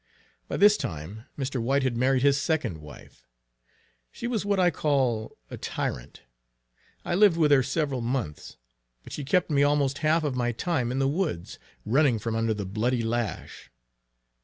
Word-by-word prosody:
By -, -, -3 dB
this 205 Hz, +1 st, +6 dB
time 90 Hz, +9 st, -6 dB
Mr. 135 Hz, -3 st, -2 dB
White 135 Hz, +4 st, +1 dB
had 130 Hz, -3 st, 0 dB
married 130 Hz, +2 st, +2 dB
his 140 Hz, 0 st, +3 dB
second 155 Hz, -, -1 dB
wife. 75 Hz, -1 st, -14 dB, 0.8 s
She -, -, -8 dB
was 240 Hz, -4 st, -1 dB
what 200 Hz, -1 st, 0 dB
I 180 Hz, -1 st, +4 dB
call 130 Hz, -8 st, 0 dB
a -, -, -6 dB
tyrant. -, -, -5 dB, 0.8 s
I -, -, -1 dB
lived 195 Hz, -2 st, +5 dB
with 155 Hz, -3 st, +3 dB
her 140 Hz, -2 st, +6 dB
several 135 Hz, 0 st, -1 dB
months, 115 Hz, -, -4 dB, 0.5 s
but -, -, -11 dB
she 145 Hz, -, -4 dB
kept 160 Hz, +4 st, +1 dB
me 140 Hz, -1 st, +3 dB
almost 145 Hz, -1 st, +2 dB
half 155 Hz, +1 st, +2 dB
of 145 Hz, -4 st, -1 dB
my 120 Hz, -1 st, 0 dB
time 125 Hz, -1 st, -1 dB
in 130 Hz, -, -2 dB
the 135 Hz, 0 st, +2 dB
woods, 150 Hz, -, -2 dB, 0.3 s
running 130 Hz, +1 st, +3 dB
from 110 Hz, +1 st, -3 dB
under 115 Hz, -1 st, 0 dB
the 105 Hz, -1 st, -4 dB
bloody 115 Hz, +5 st, -1 dB
lash. 115 Hz, -4 st, -4 dB
135 Hz, 170 wpm, -26 LUFS, 115-150 Hz, 0.8 s, this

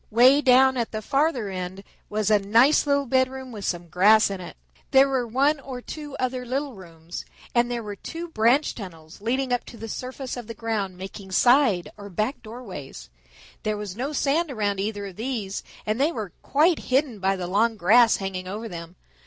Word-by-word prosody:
Way 255 Hz, +6 st, +6 dB
down 260 Hz, -1 st, +5 dB
at 235 Hz, -2 st, -1 dB
the 215 Hz, -, -4 dB
farther 275 Hz, -3 st, +1 dB
end 185 Hz, +1 st, -5 dB, 0.3 s
was 215 Hz, 0 st, 0 dB
a 210 Hz, -, +5 dB
nice 230 Hz, +10 st, +4 dB
little 280 Hz, 0 st, +2 dB
bedroom 260 Hz, 0 st, 0 dB
with 210 Hz, -3 st, -7 dB
some 175 Hz, -1 st, -2 dB
grass 200 Hz, +5 st, +5 dB
in 195 Hz, -2 st, -5 dB
it. 175 Hz, -, -9 dB, 0.3 s
There 270 Hz, +1 st, +6 dB
were 260 Hz, -3 st, 0 dB
one 275 Hz, +6 st, +2 dB
or 265 Hz, -2 st, -7 dB
two 295 Hz, +2 st, -8 dB
other 255 Hz, 0 st, -1 dB
little 270 Hz, +3 st, -3 dB
rooms, 170 Hz, -3 st, -9 dB, 0.3 s
and 240 Hz, 0 st, +3 dB
there 240 Hz, -1 st, -3 dB
were 205 Hz, -1 st, -6 dB
two 330 Hz, -, -6 dB
branch 260 Hz, 0 st, +2 dB
tunnels 165 Hz, -5 st, -10 dB
leading 255 Hz, +3 st, 0 dB
up 245 Hz, -, 0 dB
to 235 Hz, -, -11 dB
the 225 Hz, +1 st, -7 dB
surface 255 Hz, +3 st, -5 dB
of 245 Hz, -3 st, -7 dB
the 230 Hz, -, -7 dB
ground, 210 Hz, -5 st, -3 dB
making 190 Hz, 0 st, -8 dB
side 240 Hz, -5 st, +4 dB
or 205 Hz, -1 st, -9 dB
back 215 Hz, -, -2 dB
doorways. 185 Hz, -, -9 dB, 0.5 s
There 215 Hz, 0 st, -1 dB
was 205 Hz, -3 st, -6 dB
no 260 Hz, +6 st, -3 dB
sand 300 Hz, +3 st, +1 dB
around 205 Hz, -6 st, -1 dB
either 205 Hz, 0 st, -3 dB
of 190 Hz, -3 st, -9 dB
these, 220 Hz, -5 st, -3 dB, 0.2 s
and 215 Hz, +4 st, -1 dB
they 300 Hz, +4 st, +3 dB
were 215 Hz, -, -5 dB
quite 310 Hz, +4 st, +3 dB
hidden 260 Hz, -4 st, +1 dB
by 195 Hz, +1 st, +1 dB
the 185 Hz, -2 st, -4 dB
long 215 Hz, +5 st, +1 dB
grass 225 Hz, +5 st, +5 dB
hanging 190 Hz, -2 st, -4 dB
over 215 Hz, +4 st, -5 dB
them. 170 Hz, -2 st, -8 dB
225 Hz, 195 wpm, -25 LUFS, 195-260 Hz, 0.5 s, Way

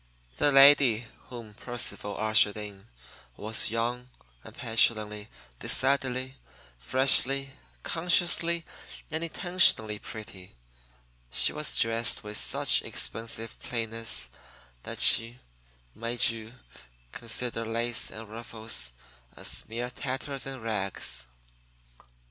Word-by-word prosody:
The 145 Hz, -, +3 dB
lady 135 Hz, -4 st, +6 dB, 0.2 s
whom 115 Hz, -4 st, -10 dB
Percival 115 Hz, -2 st, -6 dB
ushered 110 Hz, -1 st, +3 dB
in 105 Hz, -1 st, -8 dB, 0.5 s
was 110 Hz, +2 st, -1 dB
young 120 Hz, +2 st, -3 dB, 0.3 s
and -, -, -14 dB
petulantly, 110 Hz, -2 st, 0 dB, 0.3 s
decidedly, 130 Hz, -1 st, 0 dB, 0.4 s
freshly, 135 Hz, -, +4 dB, 0.3 s
consciously, 170 Hz, 0 st, +1 dB, 0.5 s
and 160 Hz, +1 st, -3 dB
intentionally 165 Hz, -, +4 dB
pretty. 95 Hz, -, -11 dB, 0.8 s
She -, -, +2 dB
was 150 Hz, -1 st, 0 dB
dressed 115 Hz, 0 st, +1 dB
with 105 Hz, 0 st, -7 dB
such -, -, +2 dB
expensive 115 Hz, 0 st, -2 dB
plainness 115 Hz, -1 st, -2 dB, 0.5 s
that -, -, -6 dB
she 115 Hz, +2 st, +5 dB, 0.6 s
made 115 Hz, +1 st, 0 dB
you 115 Hz, 0 st, -8 dB, 0.6 s
consider 115 Hz, 0 st, -3 dB
lace 115 Hz, +1 st, -1 dB
and 110 Hz, 0 st, -8 dB
ruffles 110 Hz, -, -6 dB, 0.4 s
as -, -, -2 dB
mere 120 Hz, +2 st, -5 dB
tatters 135 Hz, +1 st, -5 dB
and 135 Hz, -4 st, -7 dB
rags. 95 Hz, -, -3 dB
115 Hz, 95 wpm, -28 LUFS, 110-130 Hz, 0.8 s, lady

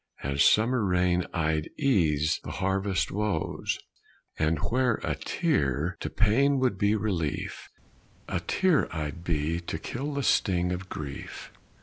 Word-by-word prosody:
As 70 Hz, +1 st, +2 dB
summer 115 Hz, +2 st, +4 dB
rain 90 Hz, -1 st, +2 dB
I'd 80 Hz, -2 st, 0 dB
ease 80 Hz, -, +2 dB
the -, -, -6 dB
harvest 95 Hz, -1 st, 0 dB
woes, 105 Hz, -5 st, -1 dB, 0.6 s
And 80 Hz, +1 st, +2 dB
where 125 Hz, -, +1 dB
a -, -, 0 dB
tear 75 Hz, +5 st, 0 dB
to -, -, -3 dB
pain 135 Hz, +6 st, +3 dB
would 125 Hz, -7 st, +1 dB
be 105 Hz, +1 st, +3 dB
relief, 95 Hz, -9 st, -2 dB, 0.6 s
A -, -, -1 dB
tear 185 Hz, -6 st, +2 dB
I'd 80 Hz, +1 st, -4 dB
be 80 Hz, 0 st, 0 dB
to 85 Hz, -1 st, -4 dB
kill 140 Hz, -, -4 dB
the 140 Hz, -, -1 dB
sting 90 Hz, -6 st, +2 dB
of 90 Hz, +1 st, -4 dB
grief. 70 Hz, -2 st, -7 dB
90 Hz, 135 wpm, -28 LUFS, 80-110 Hz, 0.6 s, summer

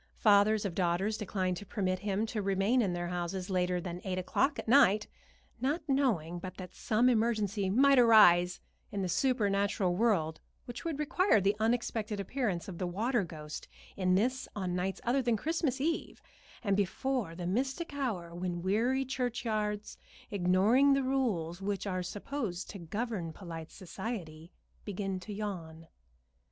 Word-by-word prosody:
Fathers 210 Hz, 0 st, +4 dB
of 190 Hz, -, -2 dB
daughters 185 Hz, +4 st, 0 dB
declined 185 Hz, -4 st, -2 dB
to 205 Hz, -, -8 dB
permit 185 Hz, -2 st, -1 dB
him 205 Hz, +2 st, -1 dB
to 220 Hz, -1 st, -3 dB
remain 195 Hz, +5 st, +2 dB
in 195 Hz, -5 st, 0 dB
their 175 Hz, 0 st, -3 dB
houses 180 Hz, +2 st, -3 dB
later 180 Hz, -1 st, +1 dB
than 175 Hz, 0 st, -6 dB
eight 185 Hz, -1 st, -2 dB
o'clock 230 Hz, +10 st, +1 dB
at -, -, -6 dB
night, 215 Hz, -5 st, +5 dB, 0.5 s
not 290 Hz, +7 st, 0 dB
knowing 215 Hz, -, +1 dB
but 185 Hz, +1 st, -8 dB
that 180 Hz, -2 st, -8 dB
some 230 Hz, +3 st, +2 dB
emergency 215 Hz, -4 st, +1 dB
might 270 Hz, +6 st, +5 dB
arise 180 Hz, -7 st, +6 dB, 0.3 s
in 200 Hz, -1 st, -2 dB
the -, -, -1 dB
supernatural 200 Hz, -4 st, +1 dB
world 180 Hz, -7 st, +1 dB, 0.3 s
which 240 Hz, 0 st, -7 dB
would 330 Hz, -4 st, -2 dB
require 300 Hz, -, +3 dB
the 200 Hz, +2 st, +2 dB
unexpected 225 Hz, -2 st, 0 dB
appearance 200 Hz, -4 st, -2 dB
of 180 Hz, -4 st, -7 dB
the 180 Hz, -, -1 dB
water 220 Hz, +5 st, 0 dB
ghost 155 Hz, -3 st, -8 dB, 0.3 s
in 185 Hz, -1 st, +2 dB
this 255 Hz, +6 st, 0 dB
on 185 Hz, -3 st, -2 dB
nights 185 Hz, +2 st, -2 dB
other 255 Hz, +3 st, +2 dB
than 240 Hz, -3 st, +1 dB
Christmas 305 Hz, -, -1 dB
Eve, 325 Hz, +4 st, -2 dB, 0.4 s
and 200 Hz, -3 st, +2 dB
before 205 Hz, 0 st, -1 dB
the 175 Hz, 0 st, -5 dB
mystic 265 Hz, -, -2 dB
hour 210 Hz, -12 st, -3 dB
when 175 Hz, 0 st, -3 dB
weary 240 Hz, +8 st, +1 dB
churchyards, 225 Hz, -5 st, -2 dB, 0.3 s
ignoring 205 Hz, +9 st, +4 dB
the 275 Hz, 0 st, +2 dB
rules 205 Hz, -11 st, -1 dB
which 200 Hz, 0 st, -2 dB
are 185 Hz, -2 st, -1 dB
supposed 200 Hz, 0 st, -4 dB
to 200 Hz, -, -8 dB
govern 195 Hz, 0 st, -3 dB
polite 165 Hz, -2 st, -8 dB
society, 180 Hz, -4 st, -7 dB, 0.3 s
begin 195 Hz, -2 st, -3 dB
to 195 Hz, +4 st, -9 dB
yawn. 170 Hz, -6 st, -6 dB
200 Hz, 155 wpm, -31 LUFS, 180-240 Hz, 0.5 s, arise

